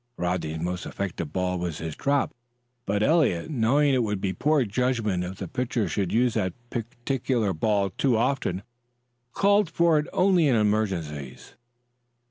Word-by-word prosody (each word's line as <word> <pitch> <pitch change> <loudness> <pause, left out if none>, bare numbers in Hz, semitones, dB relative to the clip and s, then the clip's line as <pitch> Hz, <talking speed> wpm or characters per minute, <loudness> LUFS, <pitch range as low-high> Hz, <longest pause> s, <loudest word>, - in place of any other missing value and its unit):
Rodney's 90 -3 -2
most 90 +2 -3
effective 85 -6 -4
ball 90 -1 -1
was 85 -3 -3
his 80 -1 -5
drop, 140 0 0 0.5
but 100 +1 +1
Eliot, 140 - +2
knowing 140 +3 +3
it 130 - +3
would 105 -3 -1
be 95 -1 -1
poor 145 - +2
judgment 110 -4 0
if 90 +1 -6
the - - -5
pitcher 125 -5 -1
should 95 +2 -1
use 120 0 +2
that 95 -5 -1 0.2
particular 120 -2 -1
ball 100 +3 +1
too 125 +4 +1
often, 105 -7 0 0.7
called 200 - +3
for 165 -1 +3
it 150 - -3
only 180 -4 +3
in 130 - +3
emergencies. 95 - -1
110 Hz, 150 wpm, -26 LUFS, 90-135 Hz, 0.7 s, knowing